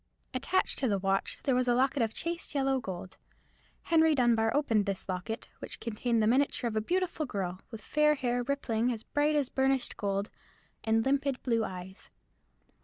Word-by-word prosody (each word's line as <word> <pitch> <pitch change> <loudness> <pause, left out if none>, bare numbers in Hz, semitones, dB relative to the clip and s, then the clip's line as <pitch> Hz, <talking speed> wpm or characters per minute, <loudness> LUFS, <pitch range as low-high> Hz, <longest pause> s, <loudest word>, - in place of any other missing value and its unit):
Attached 275 +9 +1
to 265 - +1
the 205 -3 +1
watch 195 0 -1
there 270 - +2
was 250 0 +1
a 240 - +3
locket 265 +1 +2
of 225 -1 +1
chased 335 +3 -4
yellow 270 -1 +2
gold. 185 -4 -7 0.7
Henry 320 -2 +4
Dunbar 230 -3 +3
opened 225 -8 +2
this 195 -1 -3
locket, 185 +5 -4
which - - -6
contained 230 0 0
the - - +3
miniature 255 +1 +2
of 225 - -3
a 215 - +1
beautiful 345 - -1
girl, 185 -5 -4
with 225 -2 -8
fair 300 +5 +3 0.3
rippling 240 -5 0
hair 250 - +1
as 220 - -10
bright 295 +1 +1
as 285 -3 +1
burnished 265 -1 +2
gold, 200 0 -2 0.5
and 225 0 +2
limpid 275 -1 0
blue 230 -3 +1
eyes. 185 -1 -8
245 Hz, 180 wpm, -30 LUFS, 215-280 Hz, 0.7 s, Henry